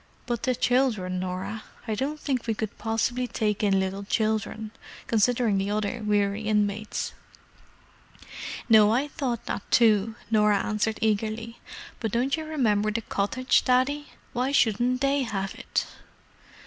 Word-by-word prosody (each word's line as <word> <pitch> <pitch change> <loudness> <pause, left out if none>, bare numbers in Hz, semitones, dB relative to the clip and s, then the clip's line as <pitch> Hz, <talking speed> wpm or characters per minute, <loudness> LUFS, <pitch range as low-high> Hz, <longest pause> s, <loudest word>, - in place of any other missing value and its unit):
"But 240 -2 -2
the 255 -1 +1
children, 240 -8 +1
Norah? 185 +4 -4 0.3
I 220 - 0
don't 280 +8 -2
think 260 -6 -2
we 225 - 0
could 215 -1 -4
possibly 240 +3 0
take 210 -2 -1
in 195 -2 +3
little 190 +1 -2
children, 215 +1 -1 0.3
considering 230 -2 +2
the 195 +1 -1
other 215 +3 -1
weary 205 0 +1
inmates." 210 -1 -1 1.5
"No, 215 -2 +7
I 260 +6 +1
thought 250 -5 -3
that - - -3
too," 220 -2 +4 0.2
Norah 210 -2 +4
answered 215 +1 -1
eagerly. 220 +2 -1 0.4
"But 225 -3 -2
don't 250 +4 +1
you 315 -1 -5
remember 220 -9 +1
the 220 +2 -1
cottage, 225 +5 +1
Daddy? 265 +4 +2 0.3
Why 255 +2 0
shouldn't 245 0 +2
they 275 0 +2
have 195 -5 -2
it?" - - -2
220 Hz, 140 wpm, -26 LUFS, 210-250 Hz, 1.5 s, No